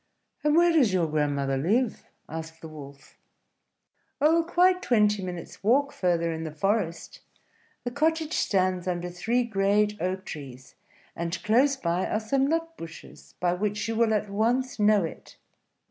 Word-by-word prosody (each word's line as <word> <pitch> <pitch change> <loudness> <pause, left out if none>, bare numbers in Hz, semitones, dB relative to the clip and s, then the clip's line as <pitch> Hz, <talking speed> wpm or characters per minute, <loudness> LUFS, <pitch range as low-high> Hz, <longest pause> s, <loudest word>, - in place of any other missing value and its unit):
"And 300 0 +3
where 345 +1 +5
does 270 -10 +4
your 180 -3 +2
grandmother 145 -3 0
live?" 215 - 0 0.2
asked 160 0 -7
the 160 - -8
Wolf. 140 -2 -12 1.0
"Oh, 320 +3 +4
quite 365 +2 +3
twenty 210 - +2
minutes' 180 -1 -7
walk 280 +7 +3
further 170 -2 0
in 160 0 -5
the 160 - -4
forest. 170 +1 -2 0.6
The 245 - -3
cottage 320 +3 0
stands 185 -2 +1
under 175 0 -2
three 230 +8 0
great 210 -1 +1
oak 185 +2 -2
trees; 130 -4 -9 0.4
and 170 +1 -3
close 260 +6 +3
by 175 -3 -1
are 215 - 0
some 265 +5 +1
nut 330 +1 -1
bushes, 165 -1 -11
by 175 -1 +1
which 210 +3 -2
you 225 - -2
will 225 -1 +3
at 210 0 -1
once 235 +5 0
know 210 -2 +4
it." 165 - -8
205 Hz, 155 wpm, -27 LUFS, 170-250 Hz, 1.0 s, where